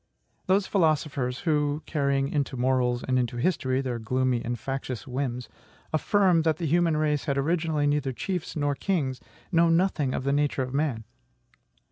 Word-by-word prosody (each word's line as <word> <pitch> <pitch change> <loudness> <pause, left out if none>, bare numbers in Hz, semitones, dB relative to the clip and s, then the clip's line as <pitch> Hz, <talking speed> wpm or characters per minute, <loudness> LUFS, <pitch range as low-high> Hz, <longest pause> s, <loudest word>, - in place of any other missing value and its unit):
Those 190 +1 +3
philosophers 150 -8 0
who 150 -2 0
(carrying 140 -3 0
into 140 -3 -2
morals 125 -1 +1
and 130 -1 +2
into 120 -1 -2
history 130 -3 0
their 125 -3 -3
gloomy 125 +1 0
and 120 +1 -3
factious 130 -2 -4
whims) 125 -2 -3 0.5
affirm 180 +1 +3
that 160 -1 +1
the 170 - -3
human 165 0 +2
race 150 -2 0
had 140 -2 0
originally 155 0 0
neither 145 -2 +1
chiefs 180 - -4
nor 145 -2 0
kings, 140 -6 -1 0.3
know 170 -1 +4
nothing 165 -6 +1
of - - -3
the 140 +1 +1
nature 145 -2 +1
of 130 0 -6
man. 140 -6 -1
140 Hz, 160 wpm, -27 LUFS, 130-160 Hz, 0.5 s, know